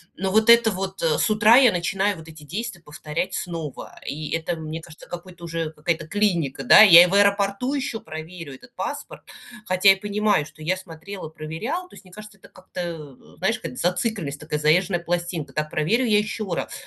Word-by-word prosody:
Но 190 Hz, +1 st, -2 dB
вот 220 Hz, +3 st, +3 dB
это 235 Hz, -1 st, +7 dB
вот, 190 Hz, 0 st, -5 dB
э, 160 Hz, -2 st, +2 dB
с -, -, +2 dB
утра 215 Hz, +2 st, +6 dB
я 255 Hz, -3 st, +6 dB
начинаю 190 Hz, +2 st, -1 dB
вот 160 Hz, 0 st, -12 dB
эти 160 Hz, -1 st, -13 dB
действия 195 Hz, +4 st, -6 dB
повторять 155 Hz, +4 st, -5 dB
снова, 165 Hz, -6 st, -6 dB
и 150 Hz, +1 st, -5 dB
это, 165 Hz, +1 st, -2 dB
мне 160 Hz, 0 st, -6 dB
кажется, 165 Hz, -1 st, -14 dB
какое-то 175 Hz, 0 st, -10 dB
уже 165 Hz, -2 st, -4 dB
какая-то 160 Hz, +1 st, -3 dB
клиника, 175 Hz, -8 st, 0 dB
да, -, -, +8 dB
я 175 Hz, -5 st, +10 dB
и -, -, +2 dB
в 180 Hz, -, -4 dB
аэропорту 200 Hz, +5 st, +2 dB
еще 260 Hz, -5 st, -3 dB
проверю 160 Hz, -3 st, -9 dB
этот 185 Hz, -, -17 dB
паспорт, -, -, -6 dB, 0.4 s
хотя 185 Hz, +2 st, +4 dB
я 195 Hz, -, +2 dB
понимаю, 205 Hz, -4 st, 0 dB
что 155 Hz, 0 st, -14 dB
я 180 Hz, +4 st, +1 dB
смотрела, 185 Hz, 0 st, -9 dB
проверяла, 165 Hz, -, -5 dB
то -, -, -22 dB
есть, -, -, -14 dB
мне 185 Hz, -, -17 dB
кажется, 215 Hz, 0 st, -12 dB
это -, -, -17 dB
как-то, 185 Hz, -1 st, -12 dB
н 155 Hz, -6 st, -9 dB
знаешь, 190 Hz, +8 st, 0 dB
какая-то 250 Hz, -, -7 dB
зацикленность, 180 Hz, -5 st, -2 dB
такая 150 Hz, 0 st, -4 dB
заезженная 175 Hz, +4 st, +2 dB
пластинка: 170 Hz, -4 st, -3 dB
так 155 Hz, +1 st, -2 dB
проверю 210 Hz, +14 st, +1 dB
я 215 Hz, -2 st, +4 dB
еще 215 Hz, +1 st, -3 dB
раз, -, -, -3 dB
175 Hz, 200 wpm, -23 LUFS, 160-205 Hz, 0.4 s, я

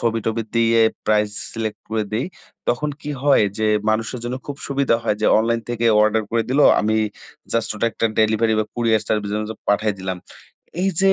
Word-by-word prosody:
ছবি-টবি 115 Hz, 0 st, -1 dB
দিয়ে, 115 Hz, 0 st, +4 dB, 0.3 s
price 105 Hz, -1 st, +2 dB, 0.2 s
select 110 Hz, -2 st, -4 dB
করে 110 Hz, -1 st, 0 dB
দেই। 120 Hz, +9 st, -1 dB, 0.4 s
তখন 150 Hz, +5 st, 0 dB
কি 150 Hz, -, -5 dB
হয় 140 Hz, -6 st, +5 dB
যে, 110 Hz, -, +1 dB, 0.2 s
মানুষের 115 Hz, +3 st, -1 dB
জন্য 120 Hz, +1 st, -3 dB
খুব 145 Hz, -1 st, -5 dB
সুবিধা 140 Hz, -4 st, +2 dB
হয় 110 Hz, -2 st, 0 dB
যে, -, -, +3 dB
অনলাইন 115 Hz, +1 st, +1 dB
থেকে 120 Hz, -1 st, -1 dB, 0.2 s
অর্ডার 110 Hz, +1 st, +2 dB
করে 115 Hz, 0 st, +1 dB
দিলো। 145 Hz, +3 st, +4 dB, 0.2 s
আমি 110 Hz, +1 st, +1 dB, 0.6 s
জাস্ট 115 Hz, -, 0 dB
ওটা 110 Hz, +2 st, 0 dB
একটা 115 Hz, -, 0 dB
ডেলিভারি 110 Hz, +1 st, +3 dB
বা 110 Hz, -, +2 dB
কুরিয়ার 115 Hz, -3 st, +2 dB
সার্ভিসের 105 Hz, -1 st, -1 dB
মাধ্যমে 110 Hz, +1 st, -7 dB
পাঠিয়ে 105 Hz, 0 st, +1 dB
দিলাম। 95 Hz, -1 st, -3 dB, 0.6 s
এইযে, 195 Hz, 0 st, +3 dB
115 Hz, 180 wpm, -21 LUFS, 110-120 Hz, 0.6 s, হয়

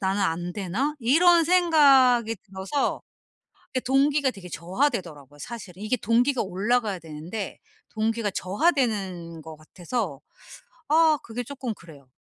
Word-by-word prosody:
'나는 195 Hz, +1 st, 0 dB
안 175 Hz, -1 st, -1 dB
되나?' 210 Hz, +11 st, -2 dB
이런 335 Hz, +8 st, +5 dB
생각이 275 Hz, -10 st, +4 dB
들어서 195 Hz, +8 st, -2 dB, 0.7 s
이게 255 Hz, -, +1 dB
동기가 275 Hz, +2 st, +2 dB
되게 195 Hz, -6 st, -11 dB
저하되더라고요 170 Hz, -, -3 dB
사실. 215 Hz, -1 st, -8 dB
이게 215 Hz, +5 st, -1 dB
동기가 245 Hz, +4 st, +1 dB
올라가야 205 Hz, +1 st, -1 dB
되는데 165 Hz, +6 st, -7 dB, 0.3 s
동기가 220 Hz, -1 st, -1 dB
저하되는 190 Hz, -, -1 dB
것 160 Hz, 0 st, -10 dB
같아서 170 Hz, -, -5 dB, 0.7 s
아 315 Hz, 0 st, +4 dB
그게 235 Hz, +2 st, -5 dB
쪼끔 255 Hz, -2 st, -5 dB
그래요. 145 Hz, -8 st, -16 dB
220 Hz, 295 characters per minute, -25 LUFS, 180-265 Hz, 0.7 s, 이런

